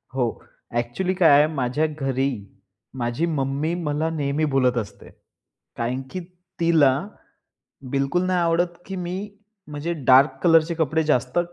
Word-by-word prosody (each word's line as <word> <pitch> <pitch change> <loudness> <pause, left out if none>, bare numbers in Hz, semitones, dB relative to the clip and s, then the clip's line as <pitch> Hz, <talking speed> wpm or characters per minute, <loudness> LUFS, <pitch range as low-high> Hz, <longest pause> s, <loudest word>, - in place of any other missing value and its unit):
हो, 120 -3 -2 0.3
ॲक्चुअली 120 +11 -1
काय 180 -3 +5
आहे 150 +1 +5
माझ्या 135 +2 0
घरी, 135 0 0 0.7
माझी 120 +7 -1
मम्मी 140 +4 -1
मला 150 +1 -1
नेहमी 150 -1 -1
बोलत 125 -2 +2
असते. 105 -4 -6 0.7
कारण 125 +3 -2
की 185 - -4 0.4
तिला, 165 -5 +4 1.0
बिलकुल 140 +6 0
नाही 185 -1 +1
आवडत, 170 +1 0
की 195 - -6
मी 180 0 -4 0.5
म्हणजे 150 +3 -4
डार्क 135 +3 +5
कलरचे 165 -1 +4
कपडे 160 0 0
जास्त 125 +4 0
150 Hz, 130 wpm, -23 LUFS, 130-170 Hz, 1.0 s, काय